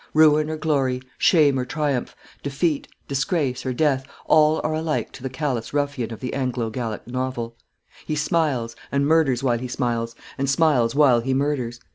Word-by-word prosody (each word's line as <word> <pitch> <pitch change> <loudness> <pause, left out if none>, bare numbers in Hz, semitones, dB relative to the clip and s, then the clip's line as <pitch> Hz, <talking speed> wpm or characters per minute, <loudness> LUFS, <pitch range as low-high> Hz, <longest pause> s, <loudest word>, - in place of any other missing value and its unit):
Ruin 155 -1 +5
or 155 - -3
glory, 135 -5 0 0.2
shame 145 -6 +4
or - - 0
triumph, 145 -2 -2 0.3
defeat, 145 +2 -1 0.2
disgrace, 140 -2 -1
or - - 0
death, 135 0 +1 0.2
all 155 0 +4
are 155 - 0
alike 155 0 -1
to - - -12
the 130 - -3
callous 130 -3 -3
ruffian 140 -5 -1
of 115 - -8
the 130 - -4
Anglo 125 -4 -1
Gallic 110 -2 -4
novel. 120 -2 -3 0.5
He 155 - -1
smiles, 150 -7 0 0.2
and 140 0 +1
murders 145 -5 +3
while 120 -3 +2
he 125 - -4
smiles, 115 -2 -2 0.2
and 135 0 0
smiles 135 -5 +3
while 140 -5 +5
he 130 +3 -1
murders. 130 -4 -1
135 Hz, 170 wpm, -23 LUFS, 125-150 Hz, 0.5 s, Ruin